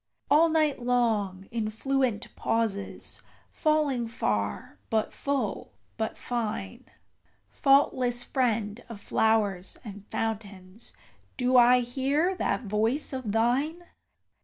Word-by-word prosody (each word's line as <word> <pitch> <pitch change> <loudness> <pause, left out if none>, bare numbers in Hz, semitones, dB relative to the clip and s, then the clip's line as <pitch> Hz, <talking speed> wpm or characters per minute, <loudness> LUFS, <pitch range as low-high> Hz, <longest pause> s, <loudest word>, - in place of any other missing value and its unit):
All 320 +3 +6
night 310 -4 +1
long, 220 -6 0
in 225 -2 -1
fluent 255 0 -1
pauses, 215 -4 -2 0.3
falling 295 -6 +1
far, 100 - -2
but 220 -1 0
full, 275 -7 -2 0.2
but 220 -1 -3
fine, 215 - -4 0.7
Faultless 255 - +3
friend 230 -4 -1
of 230 -3 -8
flowers 205 -4 +1
and 205 -2 -10
fountains, 205 -2 -5 0.4
do 255 0 +1
I 250 0 +7
hear 275 +8 0
that 260 - -1
voice 225 +8 0
of 255 -5 -3
thine. 265 +10 +1
235 Hz, 105 wpm, -28 LUFS, 210-265 Hz, 0.7 s, I